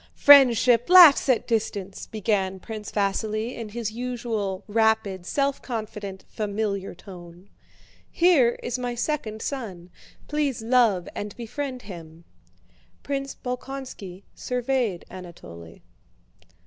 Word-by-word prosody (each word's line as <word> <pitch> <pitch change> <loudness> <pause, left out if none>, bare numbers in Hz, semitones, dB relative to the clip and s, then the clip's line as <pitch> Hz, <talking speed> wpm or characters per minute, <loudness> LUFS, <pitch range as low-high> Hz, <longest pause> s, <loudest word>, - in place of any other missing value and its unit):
"Friendship 250 -3 +6
laughs 345 -7 +8
at 250 - +2
distance," 205 -4 -3
began 195 -3 -1
Prince 215 0 -8
Vasíli 215 +3 -1
in 230 -2 -7
his 225 0 -4
usual 225 -5 -4
rapid, 210 -4 +1
self 280 -1 0
confident, 210 -5 -6
familiar 205 -2 -3
tone. 175 0 -13 0.6
"Here 315 -9 +3
is 245 +1 -3
my 245 -1 -3
second 230 -5 -3
son; 190 -10 -6 0.4
please 290 -6 -1
love 225 -7 +2
and 205 0 -6
befriend 255 +2 -5
him." 170 -4 -11 0.8
Prince 275 -1 -4
Bolkónski 250 -7 -7
surveyed 250 -6 -2
Anatole. 85 - -11
220 Hz, 105 wpm, -25 LUFS, 195-250 Hz, 0.8 s, laughs